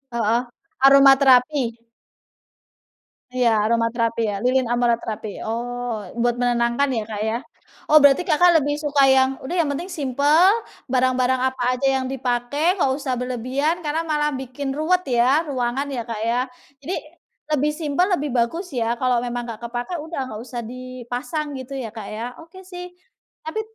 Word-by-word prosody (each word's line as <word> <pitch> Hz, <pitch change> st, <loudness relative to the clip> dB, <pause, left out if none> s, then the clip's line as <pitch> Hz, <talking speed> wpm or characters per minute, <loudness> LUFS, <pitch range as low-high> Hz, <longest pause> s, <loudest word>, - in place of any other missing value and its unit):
Heeh. 230 Hz, +1 st, +2 dB, 0.4 s
Aromaterapi. 275 Hz, 0 st, +6 dB, 1.7 s
Iya, 245 Hz, -2 st, +3 dB
aromaterapi, 230 Hz, +1 st, 0 dB
ya, 205 Hz, -2 st, -2 dB
lilin 255 Hz, 0 st, +2 dB
aromaterapi. 235 Hz, -3 st, -1 dB, 0.2 s
Oh, 240 Hz, 0 st, -3 dB, 0.2 s
buat 240 Hz, 0 st, +2 dB
menenangkan, 240 Hz, +3 st, +1 dB
ya, 220 Hz, -, -1 dB
Kak, 210 Hz, -1 st, -5 dB
ya. 230 Hz, -, -1 dB, 0.5 s
Oh, 305 Hz, -1 st, +7 dB
berarti 285 Hz, +5 st, +5 dB
Kakak 345 Hz, +1 st, +5 dB
lebih 290 Hz, -1 st, 0 dB
suka 285 Hz, -2 st, +3 dB
yang, 265 Hz, 0 st, +5 dB, 0.2 s
udah, 345 Hz, -, -4 dB
yang 335 Hz, -5 st, +1 dB
penting 285 Hz, +5 st, -3 dB
simpel, 295 Hz, +2 st, +3 dB, 0.4 s
barang-barang 255 Hz, 0 st, +2 dB
apa 260 Hz, 0 st, -1 dB, 0.2 s
aja 275 Hz, -, -2 dB, 0.2 s
yang -, -, -4 dB
dipakai 265 Hz, +6 st, 0 dB
nggak 270 Hz, -, +3 dB
usah 270 Hz, -3 st, -3 dB
berlebihan 265 Hz, +7 st, -2 dB
karena 310 Hz, +2 st, 0 dB
malah 300 Hz, -2 st, 0 dB
bikin 265 Hz, +1 st, -5 dB
ruwet, 360 Hz, +5 st, +1 dB
ya, 260 Hz, +5 st, +2 dB
ruangan, 260 Hz, 0 st, -2 dB
ya, 240 Hz, -, -2 dB
Kak, 220 Hz, -2 st, -4 dB
ya. 235 Hz, +2 st, +1 dB, 0.4 s
Jadi 350 Hz, +7 st, -3 dB, 0.6 s
lebih 295 Hz, +1 st, +2 dB
simpel 305 Hz, +4 st, +1 dB
lebih 295 Hz, -1 st, -3 dB
bagus, 255 Hz, +10 st, 0 dB
ya, 235 Hz, -1 st, -1 dB
kalau 250 Hz, -1 st, +1 dB
memang 245 Hz, 0 st, -4 dB
nggak 230 Hz, -1 st, -8 dB
kepakai, 245 Hz, +9 st, -4 dB
udah 320 Hz, -1 st, -6 dB
nggak 220 Hz, -3 st, -7 dB
usah 240 Hz, -1 st, -5 dB
dipasang 255 Hz, +4 st, -5 dB
gitu, 270 Hz, +1 st, -6 dB
ya, 230 Hz, -4 st, -6 dB
Kak, 220 Hz, -3 st, -8 dB
ya. 230 Hz, +3 st, -5 dB
Oke, 370 Hz, +3 st, -14 dB
sih. 360 Hz, -1 st, -8 dB, 0.6 s
Tapi 375 Hz, +8 st, -3 dB
260 Hz, 155 wpm, -22 LUFS, 240-295 Hz, 1.7 s, Oh